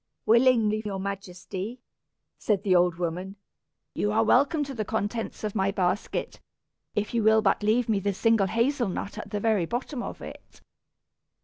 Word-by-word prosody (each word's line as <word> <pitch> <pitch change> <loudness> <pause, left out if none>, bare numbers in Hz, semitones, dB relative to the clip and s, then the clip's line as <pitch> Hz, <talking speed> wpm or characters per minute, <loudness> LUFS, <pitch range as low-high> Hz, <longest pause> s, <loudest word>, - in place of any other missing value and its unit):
"Willingly, 225 -2 +4
your 200 -3 -4
Majesty," 195 +3 -6 0.6
said 205 -4 0
the 190 -3 +3
old 175 -1 +3
woman. 180 +3 -4 0.6
"You 210 - 0
are 220 +1 +3
welcome 280 +6 +3
to 275 -1 -6
the 220 -4 -2
contents 220 +2 -3
of 210 -2 -2
my 195 -2 +1
basket, 190 0 -2 0.6
if 210 +2 -1
you 235 - +2
will 220 0 +4
but - - +2
leave 220 +3 +2
me 215 -3 +1
the 200 0 -1
single 225 -2 +3
hazel 235 +3 +1
nut 200 +2 -5
at 210 - -8
the 210 0 -2
very 205 -5 +1
bottom 245 - -3
of - - -6
it." - - -11
210 Hz, 170 wpm, -27 LUFS, 195-230 Hz, 0.6 s, Willingly